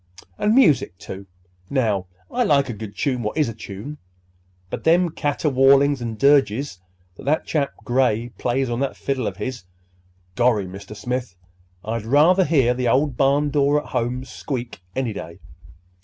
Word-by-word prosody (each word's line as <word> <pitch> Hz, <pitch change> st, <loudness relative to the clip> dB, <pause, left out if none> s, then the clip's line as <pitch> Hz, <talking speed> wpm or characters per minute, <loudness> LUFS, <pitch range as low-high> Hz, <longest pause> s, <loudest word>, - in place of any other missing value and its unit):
And 215 Hz, +2 st, +2 dB
music, 155 Hz, -, +4 dB
too. 95 Hz, +1 st, -9 dB, 0.4 s
Now, 110 Hz, -9 st, 0 dB, 0.2 s
I 250 Hz, -, +1 dB
like 140 Hz, -, +3 dB
a -, -, -2 dB
good 105 Hz, -1 st, -8 dB
tune 130 Hz, -4 st, 0 dB
what 105 Hz, +4 st, -3 dB
is 150 Hz, -, +3 dB
a -, -, -5 dB
tune; 110 Hz, +7 st, -8 dB, 0.7 s
but -, -, -5 dB
them 170 Hz, +1 st, +3 dB
caterwaulings 140 Hz, -2 st, +3 dB
and 115 Hz, -2 st, -4 dB
dirges 140 Hz, -4 st, +2 dB, 0.4 s
that -, -, -11 dB
that 155 Hz, +3 st, +1 dB
chap 145 Hz, -3 st, 0 dB
Gray 120 Hz, -2 st, +1 dB
plays 130 Hz, +2 st, 0 dB
on 120 Hz, 0 st, -2 dB
that 135 Hz, -1 st, -2 dB
fiddle 135 Hz, -4 st, -2 dB
of -, -, -5 dB
his—gorry, 90 Hz, 0 st, -3 dB
Mr. 100 Hz, +3 st, -9 dB
Smith, 125 Hz, -3 st, -4 dB, 0.5 s
I'd 110 Hz, 0 st, -3 dB
rather 160 Hz, +9 st, +4 dB
hear 135 Hz, -6 st, +3 dB
the 125 Hz, 0 st, -1 dB
old 135 Hz, +3 st, +2 dB
barn 140 Hz, +3 st, +2 dB
door 145 Hz, 0 st, +3 dB
at -, -, -11 dB
home 125 Hz, 0 st, -2 dB
squeak 125 Hz, -, -6 dB
any 130 Hz, -4 st, -1 dB
day. 85 Hz, -3 st, -8 dB
125 Hz, 155 wpm, -22 LUFS, 110-140 Hz, 0.7 s, music